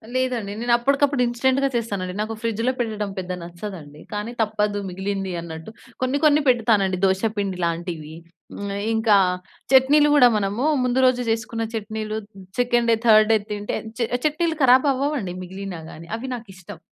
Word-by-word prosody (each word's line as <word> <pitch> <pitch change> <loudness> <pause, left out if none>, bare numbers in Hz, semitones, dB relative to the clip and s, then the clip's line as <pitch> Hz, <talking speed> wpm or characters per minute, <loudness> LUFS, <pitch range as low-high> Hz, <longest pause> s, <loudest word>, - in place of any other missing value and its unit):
లేదండి. 250 -5 -1
నేను 240 0 +1
అప్పటికప్పుడు 275 +2 +2
ఇన్‌స్టెంట్‌గా 260 +3 +1
చేస్తానండి. 200 -6 -2
నాకు 215 +1 -3
ఫ్రిడ్జ్‌లో 230 +2 0
పెట్టడం 215 -3 -2
పెద్దగా 180 -1 -4
నచ్చదండి. 170 -4 -9
కానీ 210 +3 -3
తప్పదు 210 -1 0
మిగిలింది 190 +1 -3
అన్నట్టు 160 +3 -8 0.3
కొన్ని 255 +2 +1
కొన్ని 300 0 +5
పెడతానండి 220 -6 +3
దోస 190 +1 +1
పిండి 195 -2 -2
లాంటివి. 165 -2 -4 0.4
హ్మ్, 200 0 -5 0.2
ఇంకా 220 -2 +4 0.6
చట్నీలు 290 +3 +6
గూడా 250 -4 +8
మనము 205 +4 -1 0.2
ముందు 250 +1 +1
రోజు 255 -1 +3
జేసుకున్న 225 0 -2
చట్నీలు 215 0 -4 0.4
సెకండ్ 240 -1 +2
డే, - - +5
థర్డ్ 215 -1 +6
డే - - +5
తింటే 205 0 -3 0.2
చ - - -11 0.3
చట్నీలు 320 +2 0
ఖరాబవ్వవండి 265 -4 +3
మిగిలినా 190 -1 -7
గానీ. 165 +1 -11
అవి 260 +3 -6
నాకిష్టం. 195 -5 -11
220 Hz, 145 wpm, -23 LUFS, 195-250 Hz, 0.6 s, గూడా